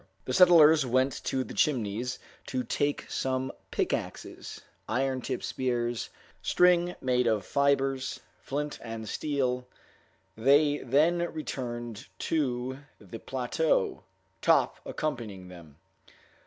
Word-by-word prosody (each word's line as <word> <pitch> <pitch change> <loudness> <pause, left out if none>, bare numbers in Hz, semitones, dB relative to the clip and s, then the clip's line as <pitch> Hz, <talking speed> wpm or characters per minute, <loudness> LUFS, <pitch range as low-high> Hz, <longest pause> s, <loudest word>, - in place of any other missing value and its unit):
The 130 - -3
settlers 160 -2 +7
went 130 +1 +1
to 130 -1 0
the - - -9
Chimneys 125 -2 0 0.3
to 130 -2 -2
take 145 +4 -1
some 130 0 -1 0.2
pickaxes, - - -3 0.3
iron 130 +2 0
tipped - - -4
spears, 120 -2 -1 0.3
string 180 0 +3
made 125 -1 +2
of 110 -4 +1
fibers, 135 -2 +1 0.2
flint 145 +1 -3
and 115 -1 -6
steel; 125 -2 -1 0.7
they 145 +5 +4
then 165 +7 +2
returned 120 -6 -5
to 130 -4 -1 0.2
the 105 +2 -9
plateau, 130 - 0 0.4
Top - - +3
accompanying 110 -11 -4
them. 85 -5 -13
130 Hz, 105 wpm, -29 LUFS, 120-145 Hz, 0.7 s, settlers